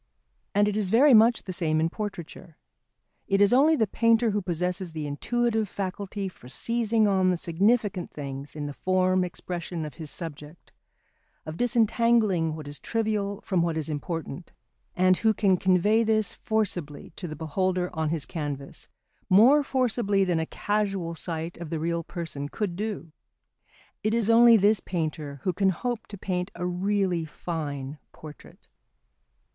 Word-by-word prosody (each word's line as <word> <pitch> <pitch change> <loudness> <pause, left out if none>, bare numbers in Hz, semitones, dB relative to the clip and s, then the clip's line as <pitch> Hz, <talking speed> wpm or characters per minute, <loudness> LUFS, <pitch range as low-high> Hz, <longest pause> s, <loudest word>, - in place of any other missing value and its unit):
And 205 0 +4
it 210 - -1
is 210 -3 -1
very 265 +7 +6
much 230 +1 +5
the 185 - -6
same 155 -3 0
in 160 - +2
portraiture. 175 -4 -7 0.7
It 195 - +2
is 205 +2 +5
only 295 +5 +5
the 225 - +2
painter 230 +2 +2
who 205 0 0
possesses 180 0 -2
the 155 -2 -4
intuitive 220 +8 -1
faculty 195 +1 -4
for 125 -9 -12
seizing 230 - +1
on 190 -2 +3
the 180 - +1
significant 195 +3 +1
things 140 0 -7
in 150 -1 -4
the 145 - -5
form 185 +2 +1
expression 175 -2 -5
of 150 - -7
his 155 - -4
subject, 155 -1 -8 0.7
of 155 0 -6
disentangling 225 -7 +2
what 155 -2 -8
is 145 0 -6
trivial 210 -3 -2
from 185 -4 0
what 165 -1 0
is 155 0 -2
important; 165 +2 -5 0.4
and 185 0 +4
who 220 -1 +2
can 195 -2 +3
convey 190 +5 +3
this 215 -3 +1
forcibly 180 -9 -2
to 180 - -6
the 155 - -6
beholder 180 +4 -1
on 160 -1 -1
his 160 -3 -2
canvas, 145 -4 -6 0.4
more 240 +10 +6
forcibly 240 -7 +1
than 175 -3 +1
a 160 - -2
casual 195 -5 -2
sight 165 0 -5
of 170 -3 -7
the 165 - -2
real 170 +1 -1
person 155 -4 -6
could 200 -2 -3
do 205 -4 -4 0.9
it 215 +1 0
is 230 -1 +2
only 230 0 +7
this 210 +1 +3
painter 155 -6 -4
who 185 - 0
can 195 +2 +2
hope 235 +4 -3
to 200 - -9
paint 180 0 -3
a 180 - -4
really 185 -1 0
fine 150 -3 -5
portrait. 150 -1 -13
185 Hz, 160 wpm, -26 LUFS, 160-215 Hz, 0.9 s, only